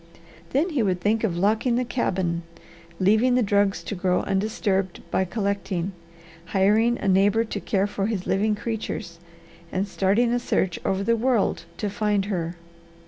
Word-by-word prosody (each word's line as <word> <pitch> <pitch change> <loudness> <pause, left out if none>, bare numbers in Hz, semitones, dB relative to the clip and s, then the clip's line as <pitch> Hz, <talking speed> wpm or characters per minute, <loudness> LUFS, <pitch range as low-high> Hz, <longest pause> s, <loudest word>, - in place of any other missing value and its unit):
Then 300 +7 +1
he 285 -6 +1
would 185 -4 +1
think 215 +4 +1
of 180 -6 0
locking 220 +6 +2
the 250 +1 0
cabin, 185 -8 -1 0.6
leaving 220 +6 +4
the 250 - +3
drugs 200 -1 +1
to - - -5
grow 180 -1 +1
undisturbed 195 -2 -1
by 190 - +2
collecting, 200 -2 -2 0.5
hiring 210 +6 +3
a - - -3
neighbour 200 +4 +4
to 225 - -4
care 195 -1 0
for 200 -1 -2
his 210 -5 -2
living 210 +2 +1
creatures, 210 -5 -5 0.5
and 190 +2 -1
starting 205 +5 +2
a 245 - +2
search 190 -6 0
over 195 0 0
the 230 +3 +2
world 235 -2 +1
to 210 - -2
find 205 -1 0
her. 175 -4 -3
200 Hz, 160 wpm, -24 LUFS, 190-225 Hz, 0.6 s, leaving